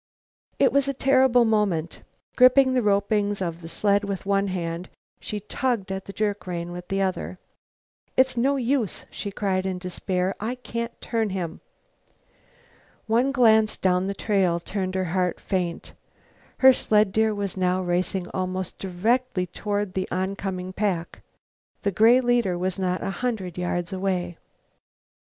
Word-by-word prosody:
It - - +4
was 280 -1 +3
a 275 - -1
terrible 260 -2 +4
moment. 200 -7 0 0.3
Gripping 260 +1 +6
the 255 - +2
ropings 205 0 +1
of 170 -2 -3
the 165 - -8
sled 200 +4 +1
with 200 -1 -4
one 200 0 +1
hand, 175 -1 -4 0.3
she 210 -1 -5
tugged 230 -2 -2
at 190 0 -4
the - - -7
jerk 205 -1 -2
rein 175 -1 -4
with 180 0 -8
the 195 0 0
other. 185 -1 -3 0.8
"It's 260 0 +4
no 265 +4 +2
use," 255 -4 -1
she 205 - -5
cried 195 -2 -1
in 190 -1 -2
despair; 180 +1 -2
"I 230 +4 -2
can't 235 -1 -5
turn 225 -2 -1
him." 180 -4 -4 1.4
One 235 +5 +2
glance 220 -5 +4
down 185 0 +1
the 200 - -3
trail 190 -5 +1
turned 185 +1 -3
her 190 0 0
heart 180 -2 0
faint; 180 -3 -3 0.6
her 265 0 +8
sled 210 -4 +2
deer 220 +1 +2
was 200 -2 -3
now 185 0 +1
racing 180 +1 -1
almost 185 0 -4
directly 195 +2 0
toward 205 +1 -3
the 190 -1 -2
oncoming 185 0 -3
pack, 185 -5 -2 0.6
the 200 - +1
gray 225 +6 +6
leader 240 -7 +1 0.2
not 185 -1 -1
a - - -2
hundred 210 -9 -2
yards 175 0 -2
away. 185 -3 -2
195 Hz, 150 wpm, -25 LUFS, 185-225 Hz, 1.4 s, her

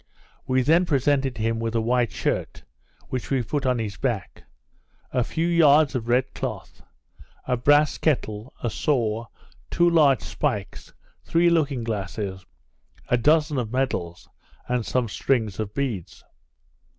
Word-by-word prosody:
We 130 0 +2
then 170 +6 +3
presented 135 -3 +1
him 115 +1 -1
with 115 0 -3
a - - +3
white 120 +1 +1
shirt, - - -3 0.5
(which 130 -2 -4
we 135 -3 +1
put 140 +4 -2
on 125 -1 +2
his 105 -3 -4
back) 120 -9 -3 0.7
a 125 -2 +1
few 165 +7 -2
yards 155 -4 +5
of 120 -4 -3
red 125 +2 +1
cloth, - - -6 0.6
a 125 - +1
brass 145 +5 +3
kettle, 115 -6 -1
a 120 - -1
saw, 115 -4 0 0.4
two 175 - +3
large 150 -6 +4
spikes, 100 -4 -3 0.3
three 170 +1 +3
looking 145 -7 +1
glasses, 100 -3 -4 0.7
a 125 - +3
dozen 150 +2 +2
of 110 -3 -4
medals, 95 -10 -2 0.4
and 125 -1 0
some 125 -2 0
strings 110 -2 -1
of 105 -2 -3
beads. 125 -11 -4
125 Hz, 140 wpm, -24 LUFS, 110-145 Hz, 0.7 s, yards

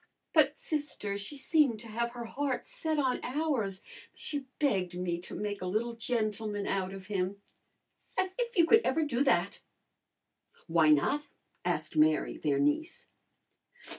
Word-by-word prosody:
"But, 300 -2 +4
sister, 290 -10 -2
she 200 +9 -5
seemed 275 -4 +3
to 235 - -10
have 235 +2 -2
her 240 -1 -6
heart 275 +2 -2
set 320 -12 -2
on 260 -3 +1
ours. 250 -9 -1 0.3
She 285 -3 -5
begged 190 -11 +1
me 175 -1 -1
to - - -7
make 205 -1 -3
a 185 - -2
little 225 +5 0
gentleman 215 -3 -1
out 190 -1 -1
of 190 -1 -8
him." 195 0 -2 0.8
"As 375 - +1
if 475 -2 -2
you 340 - +7
could 450 +6 +6
ever 320 - +2
do 275 -3 +1
that!" 195 -8 +2 1.0
"Why 165 -1 +4
not?" 280 - +3 0.4
asked 175 -3 -1
Mary, 155 0 +3
their 145 -3 +1
niece. 145 - 0
225 Hz, 150 wpm, -31 LUFS, 185-290 Hz, 1.0 s, you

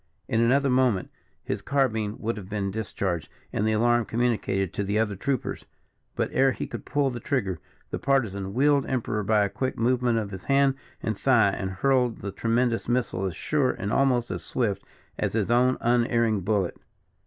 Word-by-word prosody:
In 115 - +1
another 135 +4 +3
moment 125 -7 +2 0.3
his - - -3
carbine 110 -7 0
would 115 +2 -2
have 100 -3 -9
been 100 -2 -2
discharged, 95 -6 -3 0.2
and 105 - 0
the 110 - +2
alarm 120 +1 +3
communicated 110 -6 0
to 100 - -2
the 100 +2 -1
other 105 -2 +1
troopers; 130 +5 -2 0.5
but - - -1
ere 135 0 +4
he - - -4
could - - -7
pull 145 -2 +1
the 120 - -5
trigger, 110 - -1 0.3
the - - -3
Partisan 100 -8 0
wheeled 140 +1 +3
Emperor 115 -4 -1
by 105 0 +3
a - - 0
quick 130 +6 -3
movement 120 0 +2
of 105 -3 -2
his 95 -2 -8
hand 140 0 +4 0.3
and 110 - -1
thigh, 115 -3 +4
and 95 -1 -3
hurled 125 +4 +1
the 100 - -4
tremendous 115 +2 0
missile 120 -6 0
as 90 - -5
sure 145 - +1
and 105 -4 -3
almost 125 -3 +2
as - - -4
swift 110 -6 -1 0.4
as - - -1
his 110 0 0
own 125 +2 +3
unerring 115 -2 +2
bullet. 100 -2 0
115 Hz, 185 wpm, -26 LUFS, 100-130 Hz, 0.5 s, ere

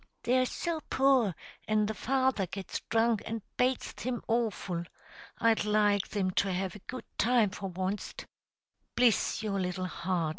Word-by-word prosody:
They're 255 +1 +3
so 330 +3 -2
poor, 260 -8 +3 0.3
an' 215 -1 +3
the 215 - -2
father 260 -4 +1
gets 190 +1 -5
drunk, 225 -1 +3
an' 225 -2 -4
bates 255 0 +1
thim 250 -1 -4
awful. 215 -7 0 0.6
I'd 230 -2 +3
like 210 -1 +3
thim 190 -3 -1
to 195 - -2
have 185 +1 -2
a - - -9
good 255 +6 -7 0.2
time 230 -4 +4
for 195 -1 -5
onst." 185 +3 -4 0.7
"Bliss 235 -2 +3
your 200 -2 -1
little 185 0 -2
heart!" 175 -2 -1
215 Hz, 150 wpm, -30 LUFS, 190-240 Hz, 0.7 s, time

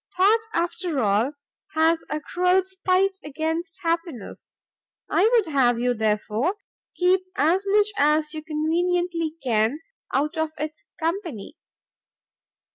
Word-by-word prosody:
Thought, 405 +5 +5 0.2
after 345 -2 -1
all, 220 +5 +2 0.4
has 320 +1 +3
a 300 - -2
cruel 360 +4 +2
spite 380 +1 0
against 320 +4 -3
happiness; 330 - -3 0.5
I 430 - +3
would 425 -11 +2
have 245 -4 +4
you, 245 +1 +1
therefore, 220 - 0 0.4
keep 365 +1 +3
as 330 +8 +2
much 415 +1 +3
as 300 +1 +3
you 310 - -5
conveniently 330 +1 0
can, 230 +3 +1 0.3
out 300 +4 0
of 315 0 -1
its 305 +1 -6
company. 330 - -3
320 Hz, 120 wpm, -24 LUFS, 285-360 Hz, 0.5 s, Thought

